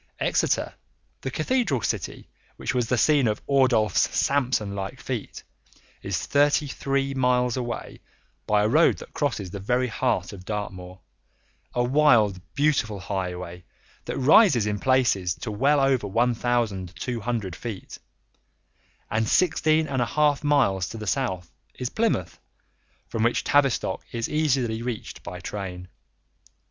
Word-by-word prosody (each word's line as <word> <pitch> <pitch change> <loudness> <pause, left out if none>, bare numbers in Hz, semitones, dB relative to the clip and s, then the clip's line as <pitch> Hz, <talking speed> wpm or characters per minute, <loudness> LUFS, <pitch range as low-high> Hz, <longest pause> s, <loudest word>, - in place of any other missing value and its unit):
Exeter, - - +1 0.5
the 135 - -3
cathedral 155 - 0
city - - -3 0.3
which - - -3
was 125 -2 0
the 125 - +1
scene 140 +1 +4
of 105 -1 0
Ordulph's 125 -7 +3
Samson 125 -7 0
like 100 +6 -5
feat, 120 -2 -5 0.6
is - - -3
thirty 145 +1 +3
three 135 0 -1
miles 125 -2 +2
away 120 -3 -5 0.5
by 105 -1 +3
a - - +3
road 155 +9 +4
that - - -12
crosses 115 - -2
the 100 - -6
very 125 +5 0
heart 125 -1 -1
of 95 -2 -10
Dartmoor, 95 -3 -6 0.7
a 120 - +2
wild, 120 -8 +3
beautiful 140 -8 +1
highway 90 -2 -5 0.4
that - - -4
rises 135 - +5
in 105 -1 -1
places 115 -9 +2
to 110 - -6
well 140 +8 +2
over 135 -5 +2
1,200 115 -2 -1
feet; 110 -6 -7 1.1
and 110 0 0
sixteen 160 -3 +3
and 135 -3 -1
a - - +2
half 150 -1 +2
miles 120 - +2
to - - -7
the 110 - -6
south 95 -8 -2 0.2
is 125 0 -4
Plymouth, 215 - -1 0.7
from 115 - -3
which 115 +2 +2
Tavistock 140 -4 +1
is 115 -1 -2
easily 130 -7 0
reached 120 -2 -5
by 90 +1 -7
train. 90 -1 -6
120 Hz, 135 wpm, -25 LUFS, 100-135 Hz, 1.1 s, rises